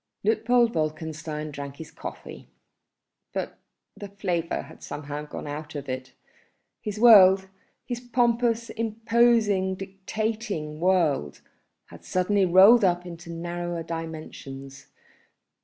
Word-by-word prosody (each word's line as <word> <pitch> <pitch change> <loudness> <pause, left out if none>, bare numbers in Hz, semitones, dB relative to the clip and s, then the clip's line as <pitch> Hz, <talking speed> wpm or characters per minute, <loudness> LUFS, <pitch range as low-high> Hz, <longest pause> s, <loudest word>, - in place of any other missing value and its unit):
Luitpold 230 +2 +3
Wolkenstein 155 -1 -3
drank 140 -1 -7
his 160 +1 -10
coffee, - - -9 0.9
but - - -4 0.4
the 205 - -8
flavour 180 -4 -2
had - - -15
somehow 145 0 -6
gone - - -7
out 150 +1 -6
of 145 -1 -5
it. 130 0 -5 0.7
His 210 0 -5
world, 195 -5 +8 0.4
his 245 -2 -4
pompous, 235 -1 +1
imposing, 225 -3 +2
dictating 195 -4 -4
world, 165 - +1 0.5
had - - -13
suddenly 190 +1 +1
rolled 195 +6 +7
up 180 -1 +2
into 170 -1 -9
narrower 175 0 -4
dimensions. 140 -4 -8
180 Hz, 105 wpm, -26 LUFS, 155-215 Hz, 0.9 s, world